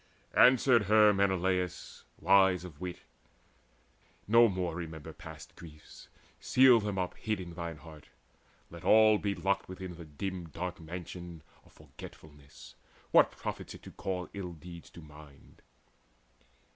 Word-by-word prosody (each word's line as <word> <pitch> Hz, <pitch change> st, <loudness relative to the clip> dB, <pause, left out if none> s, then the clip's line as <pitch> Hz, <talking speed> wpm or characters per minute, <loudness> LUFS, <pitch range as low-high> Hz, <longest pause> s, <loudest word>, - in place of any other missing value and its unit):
Answered 125 Hz, -3 st, +5 dB
her 105 Hz, +1 st, +5 dB
Menelaus 95 Hz, -2 st, -1 dB
wise 95 Hz, -2 st, +4 dB
of 85 Hz, -2 st, -12 dB
wit: 90 Hz, -1 st, -6 dB, 1.3 s
"No 115 Hz, +2 st, +6 dB
more 90 Hz, -4 st, -2 dB
remember 80 Hz, -3 st, -7 dB
past -, -, -12 dB
griefs: 75 Hz, -3 st, -14 dB, 0.3 s
seal 130 Hz, -2 st, +5 dB
them 105 Hz, -2 st, -4 dB
up 90 Hz, -1 st, -2 dB
Hid 110 Hz, -2 st, -3 dB
in 85 Hz, -2 st, -8 dB
thine 85 Hz, -1 st, -6 dB
heart. 75 Hz, 0 st, -14 dB, 0.6 s
Let -, -, -11 dB
all 110 Hz, -1 st, +5 dB
be 100 Hz, -1 st, -2 dB
locked 95 Hz, +2 st, -1 dB
within 95 Hz, -2 st, -8 dB
The 85 Hz, -, -10 dB
dim 85 Hz, +3 st, -6 dB
dark 90 Hz, +3 st, -6 dB
mansion 85 Hz, 0 st, -9 dB, 0.2 s
of -, -, -23 dB
forgetfulness. 70 Hz, -2 st, -14 dB, 0.4 s
What -, -, +6 dB
profits -, -, -7 dB
it -, -, -15 dB
to -, -, -11 dB
call 90 Hz, -2 st, -4 dB
ill 90 Hz, -3 st, -6 dB
deeds 85 Hz, +1 st, -12 dB
to 85 Hz, -, -13 dB
mind?" 75 Hz, -2 st, -16 dB
90 Hz, 135 wpm, -31 LUFS, 80-100 Hz, 1.3 s, No